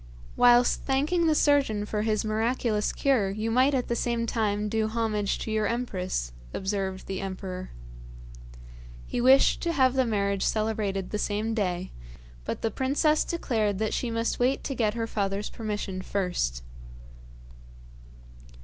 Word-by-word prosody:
'Whilst 245 0 +5
thanking 300 +6 +1
the 310 - +3
surgeon 275 -9 +2
for 210 0 -2
his 215 0 0
miraculous 220 0 0
cure, 255 -8 +1
you 215 +3 -2
might 260 +4 +4
at 250 - -1
the 235 - -1
same 235 -1 -1
time 210 -2 0
do 220 +1 0
homage 220 -2 -1
to 220 - -5
your 215 -1 +1
empress,' 185 - -2 0.2
observed 190 -1 -2
the 190 -1 -4
emperor. 185 -1 -5 1.4
He 245 - -2
wished 265 +2 +5
to 340 -1 0
have 260 -5 +3
the 260 -2 +2
marriage 200 -3 0
celebrated 210 -3 -1
the 210 - -2
same 215 +2 -1
day, 185 -4 -2 0.5
but - - -4
the 225 - +1
princess 285 +5 +2
declared 220 - -1
that 215 +1 -1
she 245 - -1
must 230 0 -1
wait 255 +2 +1
to 275 - -3
get 225 -4 0
her 230 -1 -1
father's 200 -2 -2
permission 210 -4 -4
first. 175 - -2
220 Hz, 150 wpm, -27 LUFS, 200-245 Hz, 1.4 s, Whilst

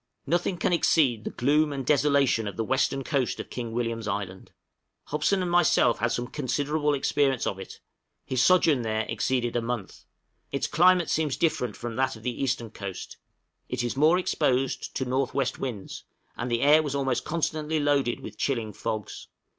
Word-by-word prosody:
{GEOLOGICAL - - -53
REMARKS.} 140 - -7
Nothing 180 - -3
can 175 - 0
exceed 135 -9 +3
the - - -2
gloom 150 +4 +2
and 135 -2 -4
desolation 140 -5 +2
of 100 - -6
the 115 - 0
western 130 +3 0
coast 130 -2 -1
of - - -7
King 120 -2 -5
William's 115 -1 -2
Island: 100 -2 -4 0.5
Hobson 170 +6 0
and 175 - -2
myself 170 -8 +3
had 115 +2 0
some 120 - -1
considerable 145 +3 -1
experience 135 -2 +1
of 95 - -2
it; 95 - -9 0.5
his 130 -1 0
sojourn 160 -6 +4
there 110 -1 -1
exceeded 120 +1 -1
a 120 - +1
month; 115 -4 -5 0.5
its 140 - -1
climate 175 +3 +4
seems 155 -4 0
different 125 -9 0
from 120 -1 -6
that 130 -2 +1
of 110 - -13
the 125 +1 -3
eastern 120 -4 -1
coast; 100 -3 -7 0.5
it 125 -1 -2
is 120 - -2
more 155 +5 +4
exposed 135 -7 0
to 130 - -1
north 130 +1 -1
west 135 -2 -1
winds, 115 -8 -5 0.3
and 125 0 -4
the 120 0 0
air 150 +2 +6
was 145 -2 -3
almost 135 -3 0
constantly 155 -1 -1
loaded 140 -3 +1
with - - -10
chilling 115 -6 -1
fogs. 105 +1 -5
130 Hz, 185 wpm, -26 LUFS, 120-150 Hz, 0.5 s, air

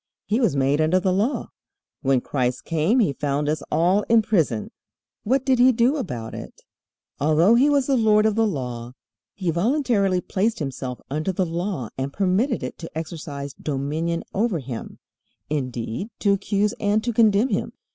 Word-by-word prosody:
"He 220 +4 +1
was 230 - +2
made 140 +2 +2
under 160 +4 +3
the 185 0 +1
law." 215 +9 -1 0.5
When 135 -3 +2
Christ 125 -2 -2
came 165 +8 +1
He 200 - +3
found 145 +1 -1
us 155 +1 0
all 175 +6 +3
in 225 -1 +5
prison. 160 - 0 0.5
What 260 +4 0
did 260 -2 +3
He 255 +1 +7
do 245 +4 +2
about 125 - -5
it? - - -9 0.6
Although 155 +8 +4
He 260 +5 +5
was 285 -2 +3
the 275 - +2
Lord 215 -3 +4
of 220 - +3
the 225 +1 +2
Law, 125 - -4 0.4
He 185 -4 -1
voluntarily 200 - +1
placed 210 +5 -1
Himself 130 -3 -5
under 155 +6 -1
the 185 0 0
Law 170 - -3
and 135 +1 -2
permitted 200 - 0
it - - -6
to 165 -1 -8
exercise 150 -4 -6
dominion 155 +4 -2
over 210 -2 +1
Him, 125 -5 -7 0.5
indeed 130 - -3
to 200 -2 +4
accuse 200 +1 0
and 210 +1 +1
to 240 0 -1
condemn 220 +2 +4
Him. 200 - -2
180 Hz, 170 wpm, -23 LUFS, 145-220 Hz, 0.6 s, He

